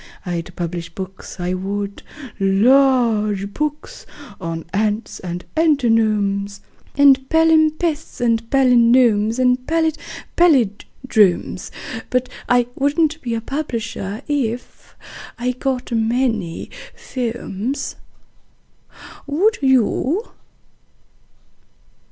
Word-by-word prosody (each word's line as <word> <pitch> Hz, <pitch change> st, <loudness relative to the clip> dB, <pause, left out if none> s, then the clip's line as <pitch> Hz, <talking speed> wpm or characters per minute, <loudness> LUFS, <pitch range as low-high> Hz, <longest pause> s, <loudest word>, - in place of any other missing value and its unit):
I'd 175 Hz, -1 st, -4 dB
publish 170 Hz, -1 st, -4 dB
books, 190 Hz, +1 st, -9 dB
I 180 Hz, +1 st, -1 dB
would 200 Hz, +2 st, -4 dB, 0.4 s
large 215 Hz, -1 st, +3 dB
books 300 Hz, 0 st, -4 dB, 0.3 s
on 165 Hz, -2 st, -5 dB
ants 210 Hz, +2 st, -1 dB
and 180 Hz, -1 st, -6 dB
antinomes 215 Hz, -9 st, +1 dB, 0.4 s
And 270 Hz, -2 st, +5 dB
palimpsests 320 Hz, -1 st, +2 dB
and 230 Hz, -2 st, +2 dB
palinodes 235 Hz, -4 st, +4 dB
and 250 Hz, 0 st, +3 dB
pallid 320 Hz, -1 st, +1 dB, 0.4 s
pallindromes: 220 Hz, -, +2 dB, 0.4 s
But 255 Hz, 0 st, 0 dB, 0.2 s
I 245 Hz, 0 st, +4 dB
wouldn't 310 Hz, +4 st, 0 dB
be 235 Hz, -2 st, -2 dB
a 225 Hz, -, -3 dB
publisher 230 Hz, -5 st, -4 dB
if.... 250 Hz, -5 st, -3 dB, 0.4 s
I 250 Hz, +1 st, -1 dB
got 255 Hz, 0 st, -3 dB
many 225 Hz, -5 st, -1 dB, 0.4 s
"pomes." 240 Hz, 0 st, -3 dB, 1.3 s
Would 370 Hz, +10 st, +1 dB
you? 265 Hz, -, +1 dB
240 Hz, 85 wpm, -20 LUFS, 200-275 Hz, 1.3 s, And